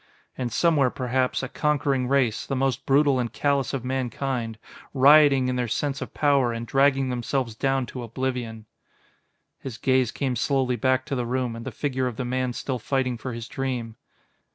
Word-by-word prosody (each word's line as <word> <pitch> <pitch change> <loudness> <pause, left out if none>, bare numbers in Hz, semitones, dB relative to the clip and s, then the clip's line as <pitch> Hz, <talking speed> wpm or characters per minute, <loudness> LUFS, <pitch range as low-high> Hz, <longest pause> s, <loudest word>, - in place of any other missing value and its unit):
"And 125 -2 -3
somewhere, 150 -5 +3
perhaps, 130 +1 -1
a - - -2
conquering 140 -3 0
race, 130 -5 +1
the 135 - -2
most 135 -2 -1
brutal 140 -1 +4
and 120 -2 -2
callous 140 -2 0
of 130 -3 -4
mankind, 125 -3 -2 0.4
rioting 140 -1 +6
in 125 0 -1
their 125 -1 0
sense 140 +4 -2
of - - -5
power 140 -5 +2
and 115 0 -4
dragging 135 +1 +2
themselves 125 0 -2
down 135 +2 0
to 125 - -7
oblivion...." 120 -2 -4 0.9
His 130 -5 -7
gaze 130 -2 +2
came 130 -3 -2
slowly 130 0 +1
back 130 +2 +1
to 145 -2 -3
the 125 -2 -2
room 125 -1 -1
and 115 0 -8
the - - -3
figure 130 -3 -1
of 125 - -4
the 125 - -3
man 125 0 -1
still 130 +1 -3
fighting 130 +1 -1
for 120 +2 -6
his 115 -1 -6
dream. 125 -4 -4
130 Hz, 180 wpm, -25 LUFS, 120-135 Hz, 0.9 s, rioting